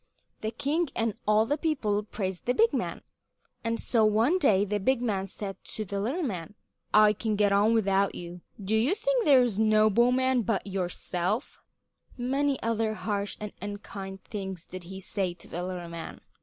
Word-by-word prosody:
The 220 - -2
king 290 +8 -1
and 225 -2 +1
all 215 +1 +4
the 290 +5 -1
people 235 -11 0
praised 190 -3 -5
the 245 - +2
big 455 +1 +4
man, - - -2 0.6
and 230 0 -1
so 230 -3 +2
one 225 - +3
day 205 - +4
the 205 +1 -1
big 260 +6 +2
man 200 -5 -1
said 195 0 -7
to 215 - -3
the 200 +1 -3
little 265 - -1
man: 195 - -4 0.4
"I 210 0 +6
can 215 +1 -1
get 205 -1 +3
on 205 +3 +4
without 195 -2 +2
you. 175 0 -8 0.2
Do 205 +2 -1
you 245 - +3
think - - +1
there's 250 -7 +5
no 215 0 +4
bowman 250 +3 +3
but 220 -2 -1
yourself?" 185 +3 -2 0.6
Many 270 +2 0
other 225 -1 0
harsh 205 -2 -3
and 210 -1 -6
unkind 200 -1 -7
things 190 -4 -6
did 185 -1 -9
he 190 +2 -8
say 190 -2 -2
to 175 - -16
the 175 - -4
little 180 -1 -5
man. 170 -1 -7
215 Hz, 180 wpm, -28 LUFS, 195-240 Hz, 0.6 s, I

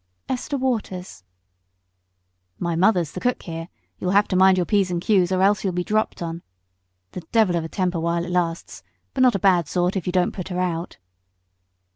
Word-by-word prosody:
"Esther 265 +3 -2
Waters." 205 - -3 1.3
"My 170 -1 -2
mother's 175 -3 +2
the - - -6
cook 250 +5 -1
here; 165 -1 -6 0.3
you'll 180 - -2
have 200 +2 +4
to 185 - 0
mind 190 0 +5
your 180 - +1
p's 200 -2 +2
and 175 -1 -1
q's 185 -1 +2
or 185 0 +2
else 205 +1 +3
you'll 190 -2 -1
be 180 0 -1
dropped 215 -2 -1
on. 165 0 -5 0.7
The 180 - -6
devil 215 -6 +3
of 170 - 0
a 160 - -6
temper 180 -2 -1
while 170 +1 -1
it 175 - -6
lasts, 170 -2 -2 0.3
but 260 - -1
not 250 -3 +5
a - - +3
bad 180 -4 +3
sort 180 +3 0
if 190 - -3
you - - +1
don't 180 -1 +1
put 185 - -6
her 180 -1 -3
out." 175 -2 -2
180 Hz, 200 wpm, -23 LUFS, 175-200 Hz, 1.3 s, mind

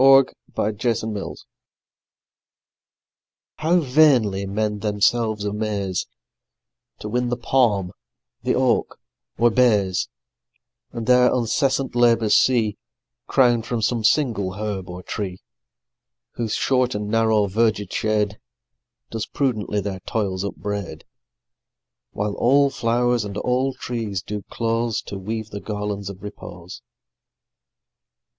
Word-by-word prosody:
Andrew 135 0 +7 0.2
Marvell 110 - +1
The 110 +1 -1
Garden 100 - -5 2.2
HOW 170 +3 +3
vainly 125 -9 +3
men 105 +1 -1
themselves 105 +1 +1
amaze 105 -3 -2 0.9
To - - -5
win 120 +3 0
the 120 - -1
palm, 115 -7 +2 0.5
the - - 0
oak, - - +1 0.4
or 120 0 +4
bays, 105 -7 +2 0.8
And 115 -1 -5
their 125 0 +5
uncessant 130 +3 0
labours 115 -3 +4
see 115 -5 +3 0.5
Crown'd 120 -4 +3
from 115 -3 -2
some 115 0 0
single 110 -7 +2
herb 100 -2 -4
or 90 +1 -7
tree, 95 -2 -4 0.9
Whose 115 -3 -2
short 130 -2 +1
and 105 0 -3
narrow 110 -1 +3
verged 105 -1 0
shade 105 -1 0 0.7
Does 110 -1 -3
prudently 110 -7 -1
their 95 -1 -4
toils 95 -2 -2
upbraid; 100 -1 -5 1.0
While 105 0 -2
all 140 +3 +4
flow'rs 120 -1 +1
and 100 -1 -6
all 130 +3 0
trees 110 -6 -4
do 105 -1 -5
close 115 -1 -1
To 100 - -7
weave 110 +2 -5
the 100 - -6
garlands 105 -2 -4
of 100 0 -10
repose. 90 -3 -9
110 Hz, 115 wpm, -22 LUFS, 100-120 Hz, 2.2 s, Andrew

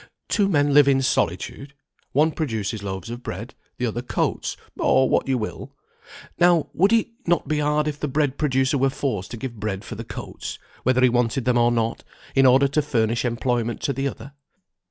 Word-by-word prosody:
Two 205 -3 +2
men 145 -5 +2
live 145 -1 +7
in 135 -1 +3
solitude; 135 +2 -1 0.4
one 155 +4 +3
produces 110 - -3
loaves 95 +1 -5
of 120 +1 -6
bread, 110 +4 -6 0.2
the 125 - -1
other 120 +1 -2
coats, 125 - -2 0.2
or 130 0 +4
what - - +1
you 135 -1 +1
will. 110 -2 -6 0.6
Now, 175 -2 +4
would 195 +5 +3
it 230 0 +3 0.2
not 175 -1 +1
be 155 -1 0
hard 150 +1 +1
if 150 -1 -3
the 150 - -2
bread 140 -1 0
producer 135 -1 +1
were 135 +1 +3
forced 135 -8 -3
to 120 - -6
give 120 -2 -6
bread 105 0 -3
for - - -7
the 115 +2 -6
coats, - - -7 0.2
whether 130 0 +2
he 130 - +6
wanted 120 +1 0
them 125 -1 +3
or 120 0 +4
not, 115 -1 -1 0.3
in 135 -1 +5
order 135 +2 +5
to 150 +2 +2
furnish 115 -5 0
employment 120 -1 -1
to 140 - 0
the 135 +1 -1
other? 140 0 -8
130 Hz, 195 wpm, -23 LUFS, 115-145 Hz, 0.6 s, live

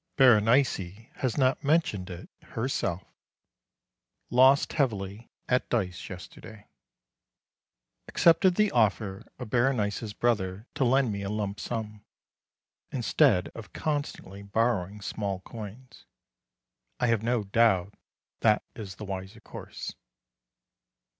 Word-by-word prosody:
Berenice 115 -4 +3
has 130 -4 -1
not 130 -1 +2
mentioned 140 - +1
it 90 0 -8
herself. 110 -7 -2 1.3
Lost 130 +3 +5
heavily 110 -6 -1 0.2
at 125 0 +1
dice 95 -7 -2
yesterday. 100 +3 -10 1.4
Accepted 175 +2 +4
the 210 0 +3
offer 105 -4 +1
of 120 -4 -8
Berenice's 115 -4 +1
brother 105 -4 0
to - - 0
lend 130 -1 +3
me 100 -1 -3
a 100 - -3
lump 105 -1 -3
sum, 105 -3 -5 0.9
instead 120 -5 +3
of 115 -2 -11
constantly 145 - -3
borrowing 105 -1 0
small 100 -2 -3
coins. 115 +5 -10 0.9
I 125 - +2
have 115 -3 +2
no 120 -1 0
doubt 100 -2 +2 0.5
that 110 -2 +3
is 100 -4 -7
the 105 - -8
wiser 95 +3 -6
course. - - -8
110 Hz, 110 wpm, -28 LUFS, 100-125 Hz, 1.4 s, Lost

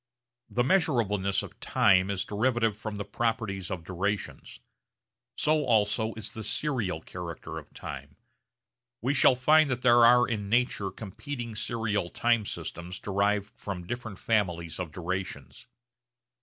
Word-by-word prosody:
The 120 - +1
measurableness 115 - +2
of - - -11
time 95 -1 +3
is 100 -2 -1
derivative 115 0 +1
from 110 0 -6
the 100 0 -4
properties 110 -6 -2
of 90 -3 -4
durations. 95 +3 -3 0.8
So 155 0 +2
also 110 -2 +1
is 110 -1 -6
the 110 - -6
serial 115 - 0
character 85 -2 -7
of - - -16
time. 70 +1 -8 0.9
We 135 +4 +2
shall 130 -1 +5
find 155 +4 +5
that 125 -1 -2
there 120 -1 +6
are 120 +1 +7
in 105 -4 -3
nature 120 -4 +1
competing 115 +4 -6
serial 110 -4 -1
time 115 -1 +1
systems 90 +2 -6
derived 100 +2 0
from 90 -4 -6
different 110 -1 -5
families 90 -8 -1
of 90 -4 -4
durations. 90 -5 -5
105 Hz, 135 wpm, -28 LUFS, 95-120 Hz, 0.9 s, are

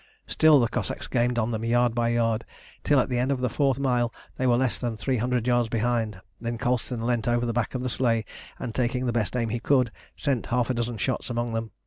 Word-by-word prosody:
Still 155 -2 +5
the 120 - +3
Cossacks - - -3
gained 120 0 0
on 120 0 +1
them 110 -1 -3
yard 120 0 +2
by 115 0 +1
yard, 115 -1 +1 0.4
till 145 -2 +4
at - - +2
the 125 -2 -1
end 130 +3 +1
of 135 - 0
the 125 -2 -1
fourth 135 -1 +2
mile 125 -3 +1 0.2
they 130 - 0
were 120 -1 +4
less 130 -1 0
than 120 -3 -3
three 130 +4 0
hundred 120 0 0
yards 120 -2 +2
behind. 115 -3 0 0.2
Then 115 0 -3
Colston 120 -1 -1
leant 120 -2 0
over 120 0 +2
the 115 - -1
back 120 +2 -1
of 125 - -2
the - - -1
sleigh, 115 -3 +1 0.3
and 115 - -5
taking 125 +1 0
the 120 - 0
best 120 +1 0
aim 115 -2 0
he 120 +2 -2
could, 125 -1 +2 0.2
sent 135 -5 -1
half 125 +1 +1
a - - +1
dozen 120 -1 -2
shots 130 +3 -2
among 120 -1 -2
them. 115 0 -2
120 Hz, 245 wpm, -26 LUFS, 115-125 Hz, 0.4 s, Still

